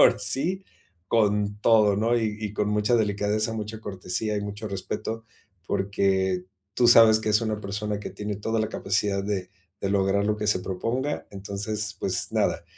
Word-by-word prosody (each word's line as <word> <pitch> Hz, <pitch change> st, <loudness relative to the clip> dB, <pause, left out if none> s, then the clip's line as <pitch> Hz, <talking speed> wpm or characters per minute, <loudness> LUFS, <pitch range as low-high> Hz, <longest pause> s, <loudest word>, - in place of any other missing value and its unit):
ahora -, -, +6 dB
sí, 180 Hz, +8 st, +1 dB, 0.4 s
con 105 Hz, -2 st, +1 dB
todo, 105 Hz, -3 st, +4 dB
¿no?, 115 Hz, +3 st, +2 dB
y 110 Hz, -2 st, -1 dB
y 105 Hz, -2 st, -4 dB
con 105 Hz, 0 st, 0 dB
mucha 105 Hz, +3 st, +2 dB
delicadeza, 105 Hz, +1 st, 0 dB
mucha 110 Hz, 0 st, -5 dB
cortesía 100 Hz, +1 st, -2 dB
y -, -, -1 dB
mucho 105 Hz, +1 st, -5 dB
respeto, 110 Hz, +3 st, -4 dB, 0.4 s
porque 95 Hz, -2 st, 0 dB, 0.3 s
tú 120 Hz, -1 st, +4 dB
sabes 110 Hz, -2 st, +8 dB
que 110 Hz, -, -3 dB
es 105 Hz, -, +4 dB
una 110 Hz, -1 st, -2 dB
persona 105 Hz, +1 st, -3 dB
que -, -, -5 dB
tiene 105 Hz, -1 st, -5 dB
toda 110 Hz, +2 st, -2 dB
la 110 Hz, -, 0 dB
capacidad 100 Hz, 0 st, 0 dB
de 95 Hz, -3 st, -3 dB, 0.3 s
de 100 Hz, -, 0 dB
lograr 100 Hz, 0 st, +2 dB
lo 105 Hz, 0 st, +1 dB
que 105 Hz, -, -2 dB
se 105 Hz, -3 st, +3 dB
proponga, 120 Hz, +11 st, -3 dB
entonces, 105 Hz, +2 st, -4 dB
pues -, -, -1 dB
nada, -, -, 0 dB
105 Hz, 175 wpm, -26 LUFS, 100-110 Hz, 0.4 s, sabes